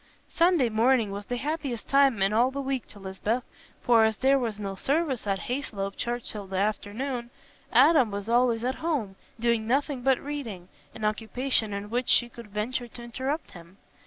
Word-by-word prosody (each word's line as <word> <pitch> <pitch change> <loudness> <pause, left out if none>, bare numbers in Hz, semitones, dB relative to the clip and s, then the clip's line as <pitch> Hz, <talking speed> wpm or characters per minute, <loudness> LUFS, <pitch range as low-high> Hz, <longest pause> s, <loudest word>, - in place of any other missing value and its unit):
Sunday 335 -7 +3
morning 225 -1 +3
was 200 +1 -6
the 245 - -2
happiest 285 -4 -3
time 275 -7 +4
in 195 +2 +2
all 240 +4 +4
the 275 +1 -5
week 270 -2 -2
to - - -11
Lisbeth, 200 +5 -2 0.4
for 230 -2 +5
as 220 -1 +2
there 270 +1 +4
was 225 -4 -3
no 200 -2 -3
service 270 - -1
at 195 -1 0
Hayslope 205 -7 -3
church 240 0 -3
till 205 -2 -7
the 190 0 -4
afternoon, 230 +5 -2 0.4
Adam 265 0 +6
was 200 0 -5
always 235 -1 +3
at 255 +1 0
home, 280 -13 -1 0.2
doing 235 -1 +1
nothing 275 +1 0
but 265 0 +3
reading, 235 -11 -6 0.3
an 215 - -4
occupation 225 +2 0
in 200 +1 -5
which 245 +1 -1
she 240 - +4
could 235 -2 -11
venture 220 +4 -3
to 240 +1 -11
interrupt 265 +6 -3
him. 175 +2 -14
235 Hz, 185 wpm, -27 LUFS, 210-265 Hz, 0.4 s, Adam